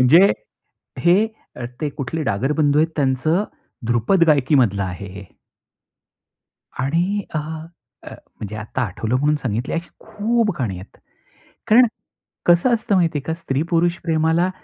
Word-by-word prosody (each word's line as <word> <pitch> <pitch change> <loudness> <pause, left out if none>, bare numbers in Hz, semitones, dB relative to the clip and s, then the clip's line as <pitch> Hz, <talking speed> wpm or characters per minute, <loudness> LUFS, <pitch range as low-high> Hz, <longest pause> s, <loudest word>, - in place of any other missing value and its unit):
म्हणजे 165 +10 +6 0.7
हे 175 +2 +6 0.6
ते 150 - 0
कुठले 140 +3 -4
डागर 130 +3 0
बंधू 145 0 +3
आहेत, 160 +1 +1
त्यांचं 145 +6 +1 0.4
ध्रुपद 120 - +3
गायकी 140 0 +2
मधलं 100 -7 +3
आहे 95 +1 -5
हे. 100 0 -9 1.5
आणि 175 +10 0
अ, - - +2 0.7
म्हणजे 105 0 -10
आता 110 +4 -4
आठवलं 110 +3 -2
म्हणून 145 +3 +2
सांगितली 120 +1 -2
अशी 170 0 -3
खूप 220 +1 0
गाणी 105 -7 -1
आहेत. 95 - -14 0.7
कारण 240 +3 +7 0.6
कसं 175 +8 +4
असतं 220 -2 0
माहिती 170 -4 +2
आहे - - -3
का, 160 - -2
स्त्री 135 -3 -1
पुरुष 175 0 +2
प्रेमाला 160 +2 +2
150 Hz, 135 wpm, -21 LUFS, 125-175 Hz, 1.5 s, कारण